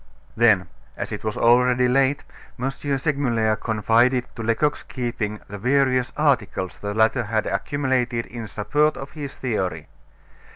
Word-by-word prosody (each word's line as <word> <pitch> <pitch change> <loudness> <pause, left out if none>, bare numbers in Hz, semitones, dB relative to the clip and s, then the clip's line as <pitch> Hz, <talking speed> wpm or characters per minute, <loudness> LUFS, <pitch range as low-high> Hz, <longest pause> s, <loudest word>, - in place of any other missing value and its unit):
Then, 110 -6 +4 0.3
as - - -4
it - - -5
was 110 -1 -3
already 125 +1 +4
late, 135 +2 +2 0.4
M. 135 +2 -1
Segmuller 135 -6 0
confided 115 +4 +2
to 115 - -6
Lecoq's 115 +6 0
keeping 120 -5 -4
the 105 0 -8
various 130 +1 +2
articles 115 - 0
the 100 0 -4
latter 110 +2 +2
had 110 0 -1
accumulated 130 -4 -1
in 115 -2 -7
support 145 +10 +1
of 135 +1 -8
his 145 -3 -7
theory. 95 - -3
120 Hz, 135 wpm, -23 LUFS, 110-135 Hz, 0.4 s, Then